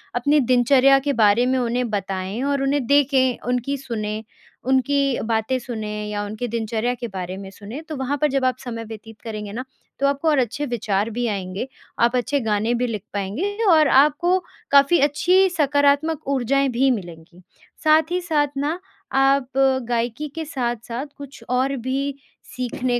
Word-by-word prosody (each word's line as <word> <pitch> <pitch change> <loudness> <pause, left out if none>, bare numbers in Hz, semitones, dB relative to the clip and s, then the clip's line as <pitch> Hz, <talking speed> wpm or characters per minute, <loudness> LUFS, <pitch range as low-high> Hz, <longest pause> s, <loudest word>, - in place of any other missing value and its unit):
अपनी 285 +5 +3
दिनचर्या 255 +2 +5
के 280 +1 -1
बारे 220 0 +4
में 260 +1 +1
उन्हें 245 0 -1
बताएँ 195 +1 -3
और 280 0 0
उन्हें 275 -1 +1
देखें, 270 -2 +3
उनकी 250 +3 -1
सुनें, 215 -4 -4 0.4
उनकी 270 +1 +1
बातें 225 +3 0
सुनें 215 -3 -5
या 205 0 -2
उनकी 215 +4 -4
दिनचर्या 230 +1 -1
के 240 0 -5
बारे 185 -2 -5
में 195 0 -8
सुनें। 210 +9 -8
तो 315 -1 -7
वहाँ 265 -1 -3
वहाँ 285 +2 0
पर 300 - +4
जब 270 -1 +1
आप 255 -1 +1
समय 230 -3 -6
व्यतीत 225 0 -11
करेंगे 215 -2 -6
ना, 250 +3 -4 0.4
तो 275 - +3
आपको 280 +3 -1
और 300 - +3
अच्छे 255 +4 -1
विचार 215 -4 -1
भी 240 +2 -2
आएँगे। 195 +2 -3 0.3
आप 235 +1 +3
अच्छे 260 +3 +1
गाने 220 -1 0
भी 245 +1 0
लिख 215 -4 -4
पाएँगे 210 - -2 0.2
और 310 -2 +6
आपको 300 +7 +4 0.3
काफ़ी 280 +4 +6
अच्छी 290 +5 +2 0.2
सकारात्मक 285 -1 +1
ऊर्जाएँ 275 0 +1
भी 260 +2 +2
मिलेंगी। 175 -5 -7 0.4
साथ 315 +1 +4
ही 360 0 0
साथ 310 -4 +1
ना 300 +5 -1 0.4
आप 270 -1 +3 0.4
गायकी 240 +4 -1
के 325 -1 -4
साथ-साथ 240 -2 -3
कुछ 280 -3 -11
और 260 +2 +1
भी 270 +3 -2 0.4
सीखने 250 0 -1
250 Hz, 170 wpm, -22 LUFS, 225-280 Hz, 0.4 s, और